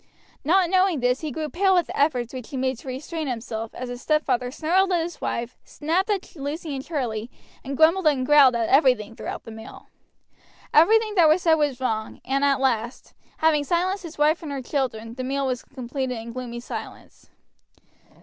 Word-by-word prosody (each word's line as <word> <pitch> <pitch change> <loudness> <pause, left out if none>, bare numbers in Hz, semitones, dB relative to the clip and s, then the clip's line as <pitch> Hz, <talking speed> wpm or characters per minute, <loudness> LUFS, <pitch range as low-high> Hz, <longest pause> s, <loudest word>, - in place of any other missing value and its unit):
Not 360 +5 +3
knowing 370 -4 +3
this 250 +1 +1
he 310 - -3
grew 305 +3 -4
pale 380 +4 +2
with 355 - +3
the - - -7
efforts 260 -5 +1
which 255 -3 -7
he 280 - -5
made 260 -1 -1
to - - -14
restrain 305 +4 -4
himself 225 -2 -4
as 255 - -5
his 245 0 -7
stepfather 260 -5 +1
snarled 355 +8 +1
at 350 - +3
his 345 0 -7
wife, 235 +1 -3
snapped 340 +7 -1
at 400 -4 -2
Lucy 295 +1 -4
and 265 - -5
Charlie, 240 -8 -3 0.3
and 275 0 -5
grumbled 330 +2 +4
and 270 -4 +2
growled 280 -3 +6
at 230 -1 0
everything 250 -6 +3
throughout - - -6
the 225 - -10
meal. 220 +2 -11 0.8
Everything 430 +7 +5
that 340 -6 +5
was 325 +4 +3
said 330 - +5
was 295 -5 +1
wrong, 220 -4 -2
and 275 +2 0
at 280 -1 +3
last, 240 -2 -1 0.2
having 315 -2 +3
silenced 365 +5 0
his 335 -3 -9
wife 300 +3 +3
and 310 -3 -6
her 275 -2 -4
children, 230 -5 -3
the 255 +1 -5
meal 275 +1 -1
was 255 -2 -2
completed 260 -1 -4
in 230 +1 -7
gloomy 240 -1 -6
silence. - - -9
275 Hz, 195 wpm, -24 LUFS, 250-320 Hz, 0.8 s, growled